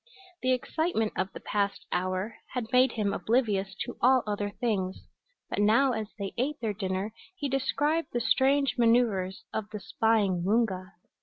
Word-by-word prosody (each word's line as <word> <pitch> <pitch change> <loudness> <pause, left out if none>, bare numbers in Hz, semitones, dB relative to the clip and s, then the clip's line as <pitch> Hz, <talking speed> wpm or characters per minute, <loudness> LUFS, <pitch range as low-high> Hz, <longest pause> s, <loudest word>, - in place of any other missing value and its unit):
The 255 - +2
excitement 255 -2 0
of 190 - -1
the - - -8
past 200 -1 -1
hour 185 +4 -1 0.2
had 240 -2 -3
made 255 -1 +4
him 205 -3 0
oblivious 205 -5 0
to 245 - -4
all 255 +1 +5
other 205 -1 -2
things, 200 -4 -2 0.4
but - - -3
now 230 +6 +4
as 220 -3 -2
they 200 -2 -4
ate 290 +4 -1
their 220 -3 -1
dinner 190 +1 -3 0.2
he 290 -6 -3
described 290 +4 0
the 240 - 0
strange 270 +2 +2
maneuvers 225 -5 +2
of 215 -1 -3
the 210 - -6
spying 200 -2 +1
Woonga. 195 -2 0
220 Hz, 160 wpm, -28 LUFS, 200-255 Hz, 0.4 s, all